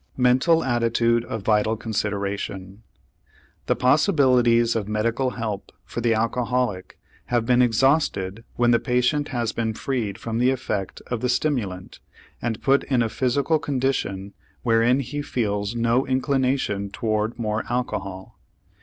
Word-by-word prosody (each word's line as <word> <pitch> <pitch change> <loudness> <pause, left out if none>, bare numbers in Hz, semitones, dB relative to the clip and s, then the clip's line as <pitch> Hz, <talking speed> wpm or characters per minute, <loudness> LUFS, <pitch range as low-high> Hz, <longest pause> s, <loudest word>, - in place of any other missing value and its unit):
MENTAL 130 +6 +3
ATTITUDE 115 -1 +1
A - - -2
VITAL 110 +1 +1
CONSIDERATION 100 -2 -3 0.9
The - - +2
possibilities 125 - +3
of 105 -3 -2
medical 115 +4 0
help 110 -4 -4
for 120 - -5
the 115 -1 +2
alcoholic 115 -3 -1 0.3
have 120 -2 0
been 125 +1 +4
exhausted 115 -5 +1
when 120 0 +3
the 115 - +4
patient 125 +5 +1
has 120 -4 -2
been 110 -1 -2
freed 110 -7 -2
from 115 0 -3
the 125 +1 +4
effect 120 -7 -3
of 120 -2 -3
the 125 - 0
stimulant 120 -10 -2 0.4
and 115 -3 -3
put 135 +1 +3
in 125 -3 +2
a 115 - -1
physical 135 +6 +1
condition 125 -9 -2 0.3
wherein 120 +3 +3
he 145 +3 -4
feels 105 -5 -2
no 120 +2 +1
inclination 130 -6 0
toward 110 +1 -2
more 110 -2 -1
alcohol. 100 -6 -4
115 Hz, 135 wpm, -23 LUFS, 110-125 Hz, 0.9 s, been